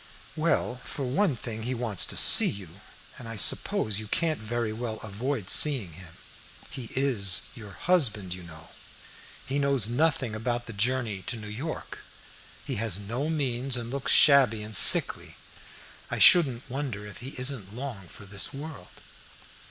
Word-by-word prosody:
"Well, 155 -5 -1
for 135 +2 -6
one 155 +4 0
thing 115 -1 -7
he 125 +3 -4
wants 115 -6 0
to - - -3
see - - +7
you, 100 -1 -10 0.4
and 120 - -10
I 115 - -6
suppose 100 +3 +1
you 110 - -7
can't 160 +6 -1
very 110 0 -4
well 110 -1 -6
avoid 110 +1 -5
seeing 130 - +3
him. 85 -1 -13 0.6
He 130 -5 -8
is 110 -9 +2
your 105 -4 -12
husband, 110 - +1
you 90 - -10
know. 80 -1 -13 0.8
He 140 +2 -3
knows 140 -6 0
nothing 130 -3 -1
about 120 +2 -4
the 115 - -10
journey 115 -1 -2
to 120 - -4
New 110 - -10
York. 130 +10 -7 0.7
He 135 -4 -5
has 105 -4 -3
no 120 +9 -4
means, 135 -4 -1
and 120 0 -6
looks 140 0 -2
shabby 130 -7 +4
and 105 0 -4
sickly. - - +6 0.7
I - - -4
shouldn't 135 -10 +5
wonder 125 -5 -6
if 105 - -11
he 130 +3 -9
isn't 125 -6 -3
long 120 -8 -8
for 100 - -14
this 100 0 -5
world." 145 +2 -11
120 Hz, 160 wpm, -26 LUFS, 105-135 Hz, 0.8 s, see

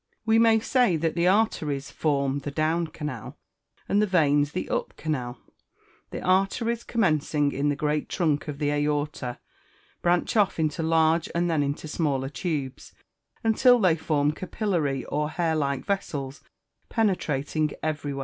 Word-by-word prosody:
We 220 0 +4
may 225 -1 +5
say 240 -6 +2
that 160 0 0
the 170 +1 +1
arteries 155 -9 +1
form 140 -2 0
the 140 - -5
down 160 +3 0
canal, 150 -7 -7 0.5
and 205 - +2
the 210 - +2
veins 145 -5 +3
the 185 - -3
up - - -3
canal. 130 -6 -3 0.7
The - - -6
arteries, 195 +5 +1
commencing 155 -8 +1
in 140 +2 0
the 145 - 0
great 150 0 -1
trunk 155 -5 0
of 145 -2 -5
the 145 0 0
aorta, 145 -3 -1 0.6
branch 175 +4 +1
off 205 -4 +3
into 155 -1 -1
large 160 0 +2
and 170 0 +1
then 155 -3 +2
into 145 +2 -3
smaller 140 -4 -1
tubes, 145 -4 -4 0.5
until 245 +3 +5
they 185 -8 +3
form 150 -2 +1
capillary 160 - -2
or 150 +1 -1
hair 160 0 0
like 140 -3 -1
vessels, 145 -9 -3 0.5
penetrating 155 - 0
everywhere. 145 -3 -2
155 Hz, 150 wpm, -26 LUFS, 145-180 Hz, 0.7 s, may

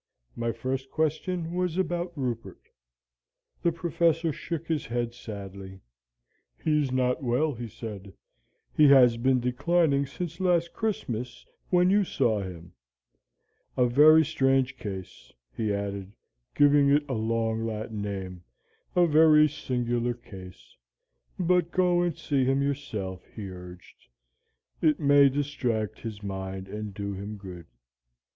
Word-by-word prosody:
My 115 0 -1
first 130 +4 -4
question 160 +3 -1
was 180 -1 -1
about 175 -1 -1
Rupert. 120 -4 -5 0.9
The 170 - +2
Professor 165 -1 0
shook 165 +1 -5
his 160 -3 -2
head 120 0 -2
sadly. 100 -4 -9 0.8
'He's 150 -4 0
not 125 +2 +1
so 140 - -8
well,' 145 +6 +1
he 120 -1 -6
said; 105 -3 -8 0.6
'he 150 - +6
has 125 -4 +6
been 130 +2 +2
declining 140 +3 +1
since 170 +4 -6
last 175 -2 +1
Christmas, 125 - -3 0.2
when 180 0 +4
you 205 +1 +4
saw 110 - 0
him. 90 -2 -9 1.0
A 125 - +4
very 155 +6 +6
strange 135 -1 +1
case,' 95 -7 -8 0.2
he 110 +6 -1
added, 100 -1 -4 0.4
giving 145 -1 +5
it 145 +1 +3
a 130 - -3
long 115 0 -1
Latin 110 -1 -4
name, 95 -3 -5 0.5
'a 175 -1 +5
very 155 -1 +6
singular 120 -4 -2
case. 95 -6 -13 0.6
But 180 -1 +2
go 180 -1 +2
and 175 -3 -1
see 140 -4 0
him 135 +2 +2
yourself,' 110 -10 -4
he 100 -4 -6
urged; 90 -1 -13 0.7
'it 155 -2 +3
may 140 -2 +6
distract 130 -7 -2
his 105 -3 -7
mind 95 -1 -5
and 105 +1 -6
do 100 0 -5
him 100 +2 -6
good?' 90 -4 -10
125 Hz, 130 wpm, -27 LUFS, 105-155 Hz, 1.0 s, he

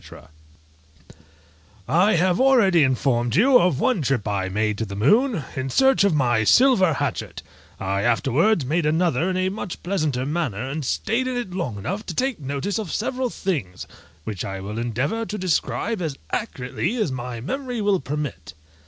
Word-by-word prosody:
_ - - -14 1.6
I 185 +7 +3
have 180 +4 +2
already 230 -11 +5
informed 125 -3 +1
you 250 - +6
of 170 -6 +2
one 255 -5 +1
trip 130 -6 -1
I 95 -2 -1
made 105 +1 -1
to 110 - -1
the 100 -1 -7
moon, 210 - +2
in 130 0 -3
search 265 - +4
of 200 -6 +3
my 120 -6 +2
silver 215 - +5
hatchet; - - -3 0.4
I 100 +1 -1
afterwards 135 - +2
made 155 +3 0
another 165 0 +1
in 185 - -1
a 185 0 +1
much 195 -2 -6
pleasanter 155 -9 -1
manner, 135 - -2
and 150 +3 -4
stayed 230 - -1
in 255 -1 -2
it 235 -7 -4
long 140 - -3
enough 195 - -4
to - - -5
take 260 -4 -1
notice 145 +9 -3
of 200 -8 -5
several 250 +3 -1
things, 130 - -3 0.4
which 100 -2 -5
I 95 0 -5
will 105 +4 -5
endeavour 125 - -1
to 210 - -4
describe 185 +3 -1
as 155 -5 -3
accurately 160 - -3
as 215 - 0
my 125 -2 -5
memory 250 - -4
will 205 -2 +2
permit. 145 - -5
155 Hz, 170 wpm, -23 LUFS, 125-205 Hz, 1.6 s, you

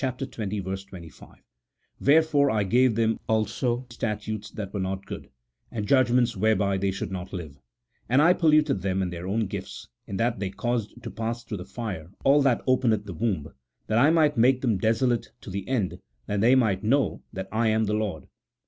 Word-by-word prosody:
25: 100 - -5 0.3
" - - -47
Wherefore 145 -1 +4
I 110 -4 +1
gave 120 +4 +3
them 115 0 +1
also 120 +3 0
statutes 110 -2 -4
that 100 -2 -7
were 100 - -2
not 95 +1 -3
good, - - -8 0.4
and 105 -3 -4
judg 130 -1 +4
ments 120 -1 +2
whereby 100 -1 +2
they 100 0 +1
should 95 0 -4
not 95 0 -5
live; 80 -7 -7 0.5
and 130 +3 +4
I 170 +4 +6
polluted 155 - +3
them 95 0 0
in 90 - -3
their 85 +1 -6
own 110 +3 0
gifts, - - -7 0.2
in 95 - -4
that 115 +3 0
they 100 - -2
caused 120 +2 -3
to 115 - -6
pass 115 +1 -4
through 105 - -5
the 90 - -7
fire 95 -6 -6
all 140 +2 +5
that 130 -4 +2
openeth 120 -5 +2
the 100 - -6
womb; 90 -6 -2 0.3
that 110 +1 +1
I 140 +5 +6
might 155 -4 +3
make 125 +2 +4
them 115 -7 +1
desolate, 115 +3 +1
to - - -9
the 100 +1 -4
end 110 -9 -1 0.3
that 105 -1 -1
they 120 +4 +5
might 105 -7 +2
know 135 +5 +1
that 95 0 -5
I 115 +1 +1
am 110 0 +2
the 105 0 -1
Lord." 105 -7 -2
110 Hz, 195 wpm, -26 LUFS, 95-125 Hz, 0.5 s, I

